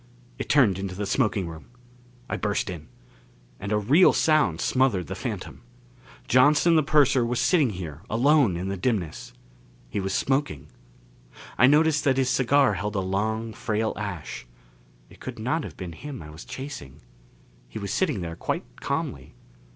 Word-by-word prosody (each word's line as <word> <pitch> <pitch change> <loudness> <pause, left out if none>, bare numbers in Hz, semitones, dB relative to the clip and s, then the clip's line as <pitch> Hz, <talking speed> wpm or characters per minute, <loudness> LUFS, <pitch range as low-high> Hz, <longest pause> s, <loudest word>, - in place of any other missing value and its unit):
It - - -5
turned 110 -10 +4
into 95 -1 -4
the 100 +2 -3
smoking 105 -5 0
room. 80 -1 -9 0.6
I - - -2
burst 105 -2 -1
in. 80 -3 -8 0.7
And 100 +2 -5
a 105 - +3
real 140 - +5
sound 150 - +2
smothered 125 -8 +1
the - - -6
phantom. - - -6 0.7
Johnson 145 +7 +5
the 155 - +5
purser 140 -3 +3
was 120 +1 -1
sitting 155 -9 +3
here 85 -6 -7
alone 125 - +3
in 90 +2 -4
the 100 0 -3
dimness. 95 -6 -2 0.6
He - - -2
was 95 0 -2
smoking. 135 - -1 0.9
I 120 - +6
noticed 150 +1 +4
that 135 -2 +3
his 130 -1 +2
cigar 130 -1 +3
held 105 +2 -3
a - - +1
long 110 +4 -2
frail 110 0 -1
ash. 100 -11 -6 0.6
It - - -18
could - - -7
not 140 +9 -1
have - - -9
been 90 -3 -6
him 135 - -8
I 75 - -10
was 80 +4 -11
chasing. 125 - -8 0.7
He - - -8
was 100 -2 -4
sitting 150 - 0
there 85 -1 -5
quite - - -5
calmly. - - -4
110 Hz, 165 wpm, -25 LUFS, 95-135 Hz, 0.9 s, I